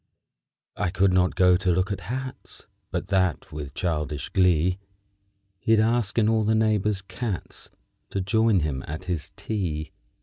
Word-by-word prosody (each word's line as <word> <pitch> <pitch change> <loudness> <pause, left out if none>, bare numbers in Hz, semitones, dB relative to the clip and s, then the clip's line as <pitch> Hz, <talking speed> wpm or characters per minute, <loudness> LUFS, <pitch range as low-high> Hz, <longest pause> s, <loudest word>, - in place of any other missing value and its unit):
_ - - -2
_I 90 - +1
could 95 0 +3
not 90 0 +3
go 90 -1 +5
to 95 0 +1
look 95 +4 +1
at 100 - -2
hats 130 +1 -6 0.2
But 90 +1 -4
that, 95 -7 +1
with 75 -2 -7
childish 75 -4 -2
glee, 90 0 +3 0.8
He'd 115 +2 +3
ask 115 -1 +1
in 110 -2 +4
all 110 0 +3
the 110 +1 +2
neighbors' 105 -3 +1
cats 105 -2 -5 0.4
To 100 - -2
join 105 0 +3
him 70 -3 -2
at 80 +4 -5
his 90 -5 -3
tea. 80 -8 -3
95 Hz, 160 wpm, -25 LUFS, 85-110 Hz, 0.8 s, go